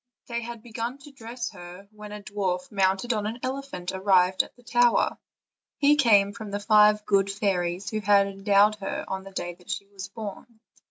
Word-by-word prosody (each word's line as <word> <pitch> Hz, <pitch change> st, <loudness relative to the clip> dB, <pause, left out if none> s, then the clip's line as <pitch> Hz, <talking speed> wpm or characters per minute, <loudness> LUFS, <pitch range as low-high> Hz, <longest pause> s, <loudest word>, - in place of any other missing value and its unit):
They 235 Hz, -1 st, -3 dB
had 235 Hz, -1 st, -8 dB
begun 235 Hz, +2 st, -5 dB
to 280 Hz, +1 st, -14 dB
dress 235 Hz, -2 st, -6 dB
her, 175 Hz, +3 st, -11 dB
when 210 Hz, -1 st, -11 dB
a 210 Hz, 0 st, -8 dB
dwarf 190 Hz, -3 st, -3 dB
mounted 195 Hz, +4 st, +1 dB
on 210 Hz, -1 st, -2 dB
an 225 Hz, +2 st, -4 dB
elephant 260 Hz, -9 st, -4 dB
arrived 190 Hz, -1 st, +3 dB
at -, -, -12 dB
the 245 Hz, -, -21 dB
tower; 240 Hz, 0 st, +2 dB, 0.6 s
he 290 Hz, +1 st, +5 dB
came 205 Hz, -8 st, +4 dB
from 220 Hz, -2 st, -8 dB
the 200 Hz, 0 st, -3 dB
five 210 Hz, 0 st, +4 dB
good 195 Hz, -1 st, +2 dB
fairies 195 Hz, -2 st, -1 dB
who 215 Hz, -, -1 dB
had 205 Hz, -1 st, +4 dB
endowed 200 Hz, +1 st, +3 dB
her 195 Hz, -1 st, -4 dB, 0.2 s
the 195 Hz, -, -10 dB
day 175 Hz, -2 st, -5 dB
she 200 Hz, -, -4 dB
was 195 Hz, -1 st, -9 dB
born. 220 Hz, +1 st, -9 dB
205 Hz, 180 wpm, -26 LUFS, 195-230 Hz, 0.6 s, he